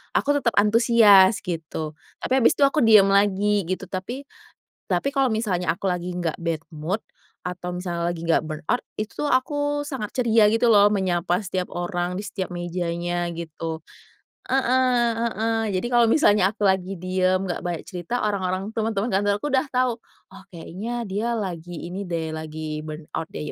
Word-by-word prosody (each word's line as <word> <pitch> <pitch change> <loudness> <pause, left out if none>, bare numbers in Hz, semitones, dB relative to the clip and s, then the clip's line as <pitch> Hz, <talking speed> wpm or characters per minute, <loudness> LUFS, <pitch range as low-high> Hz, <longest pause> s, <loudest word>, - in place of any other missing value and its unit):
aku 290 - +2
tetap 235 -4 0
antusias 210 -2 +5
gitu. 160 -4 -4 0.3
Tapi - - -4
habis 230 - +4
itu - - +2
aku 280 +2 +3
diam 215 -4 +6
lagi 200 -1 +2
gitu 185 +1 -3
tapi 195 +9 -5 0.6
tapi 275 - 0
kalau 275 -2 +2
misalnya 185 -7 0
aku 190 +2 -2
lagi 180 0 -3
nggak 175 -3 -2
bad 165 -2 -2
mood 165 +7 -3 0.4
atau 180 0 -5
misalnya 175 -1 -3
lagi 165 - -8
nggak 165 -1 +2
burnout 155 +10 -2 0.2
itu 215 +1 -3
tuh 295 - 0
aku 290 +2 0
sangat 265 -8 -5
ceria 225 -2 +5
gitu 225 +2 +3
loh, 205 0 +6
menyapa 180 -1 0
setiap 185 -1 -3
orang 175 0 -2
di 195 - -4
setiap 190 -3 -5
mejanya 175 0 -2
gitu. 165 -1 -6 0.7
Heeh 255 -2 +2
heeh. 225 0 0
Jadi 190 +5 -1
kalau 240 0 +6
misalnya 205 -9 +4
aku 205 -1 0
lagi 190 -1 0
diam 185 +1 0
nggak 175 - -3
banyak 175 -3 -3
cerita, 185 +7 -3
orang-orang 195 +1 -2
teman-teman 220 -1 -1
kantorku 205 +6 +1
udah 265 +2 +2
tahu, 250 -2 +1 0.4
"Oh, 195 - -13
kayaknya 210 +8 -5
dia 210 +5 -2
lagi 175 -4 -5
ini 190 +3 -5
deh, 160 -2 -3
lagi 155 -1 -5
burnout 155 +1 -6
deh, - - -5
190 Hz, 165 wpm, -24 LUFS, 175-225 Hz, 0.7 s, diam